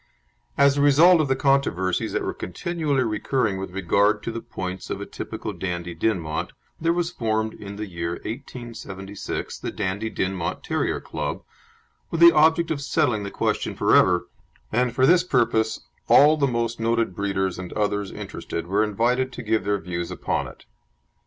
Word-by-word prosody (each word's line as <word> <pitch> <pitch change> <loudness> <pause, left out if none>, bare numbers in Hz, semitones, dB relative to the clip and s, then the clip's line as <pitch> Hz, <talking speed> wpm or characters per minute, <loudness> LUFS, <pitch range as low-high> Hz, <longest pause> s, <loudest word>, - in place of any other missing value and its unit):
As 140 0 +5
a - - +2
result 155 +5 +6
of 150 - 0
the 135 - +2
controversies 130 -10 +1
that - - 0
were - - -2
continually 145 - -2
recurring 110 -1 0
with 95 - -5
regard 100 +3 +1
to - - -3
the 115 0 -5
points 90 0 -6
of - - -3
a - - -5
typical - - -6
Dandie 85 -2 -4
Dinmont 85 -4 -2 0.3
there 165 +1 +2
was 175 0 0
formed 110 -6 -1
in 100 -1 -9
the 105 +1 -4
year 85 -3 -4
1876 110 -6 -6
the - - -4
Dandie 100 +4 -2
Dinmont 95 -4 -2
Terrier - - -1
Club, - - -4 0.7
with 165 - -3
the 170 0 +10
object 160 +2 +4
of 145 -3 -2
settling 140 -6 +1
the 100 - -4
question - - -1
for - - +3
ever, 90 -1 +4 0.4
and 125 0 +1
for 130 - +4
this 175 +4 +5
purpose 115 -7 +1 0.3
all 150 +2 +7
the 140 -2 +2
most 115 -2 -1
noted 115 -4 0
breeders 95 -2 -1
and 90 -1 -7
others 105 -2 -1
interested 85 - -6
were 100 +4 +2
invited 120 +5 +1
to 125 - -7
give 110 -2 0
their 100 0 +1
views 85 -1 -4
upon - - -2
it. - - -14
110 Hz, 170 wpm, -24 LUFS, 95-135 Hz, 0.7 s, the